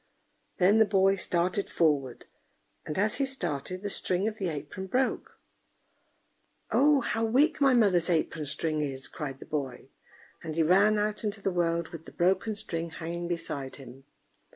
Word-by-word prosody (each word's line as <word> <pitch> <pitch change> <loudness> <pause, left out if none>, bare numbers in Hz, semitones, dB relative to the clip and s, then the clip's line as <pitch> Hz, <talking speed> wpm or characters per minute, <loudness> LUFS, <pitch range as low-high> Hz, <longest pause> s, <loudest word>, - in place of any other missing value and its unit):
Then 195 +4 +4
the 220 - +6
boy 195 -1 +3
started 180 +1 -1
forward, 145 -6 0 0.6
and 150 - -4
as 210 +2 +2
he 275 - +1
started, 185 - -3
the 205 - -2
string 185 +2 +1
of 220 -1 -4
the 190 -3 -1
apron 155 +5 -6
broke. 255 +6 -1 1.3
"Oh! 290 0 +4
how 225 -1 -1
weak 265 +7 +2
my 270 -2 +5
mother's 190 -7 +3
apron 160 -2 -1
string 155 +1 -2
is!" 135 -2 -3
cried 135 -3 -6
the - - -10
boy; 135 -3 -5 0.5
and 160 -2 -6
he 165 - +3
ran 200 +6 +4
out 210 +1 -1
into 210 0 -2
the 195 - -1
world, 170 -1 0
with 165 -1 -10
the - - -11
broken 190 +5 +1
string 165 -4 -5
hanging 170 +1 -5
beside 145 -6 -4
him. 135 -1 -13
175 Hz, 165 wpm, -28 LUFS, 155-210 Hz, 1.3 s, the